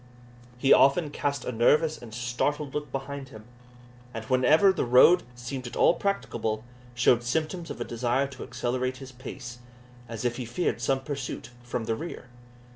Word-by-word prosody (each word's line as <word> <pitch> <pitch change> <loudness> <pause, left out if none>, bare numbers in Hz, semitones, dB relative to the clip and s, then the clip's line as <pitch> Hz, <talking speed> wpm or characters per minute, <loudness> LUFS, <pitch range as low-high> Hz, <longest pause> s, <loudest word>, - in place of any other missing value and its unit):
He 135 +2 +5
often 145 +3 +4
cast 140 -2 -2
a - - -2
nervous 150 +7 +3
and 120 -2 -10
startled 125 +5 -2
look 150 -3 -4
behind 135 0 -5
him; 110 0 -12 0.7
and 115 0 -5
whenever 140 +9 +5
the - - -1
road 130 +9 +6
seemed 125 +1 -6
at 120 - -8
all - - +5
practicable, 115 - -2 0.3
showed 120 0 +4
symptoms 160 +7 -2
of - - -6
a - - -1
desire 120 +3 0
to 135 -2 -10
accelerate 130 +1 -2
his 135 0 -10
pace, 125 -1 -9 0.5
as 115 0 -5
if 120 0 0
he 125 - -4
feared 120 0 -1
some 135 +1 +1
pursuit 135 -3 -5
from 120 -1 -4
the 115 - -1
rear. 160 -2 -7
130 Hz, 170 wpm, -27 LUFS, 120-145 Hz, 0.7 s, road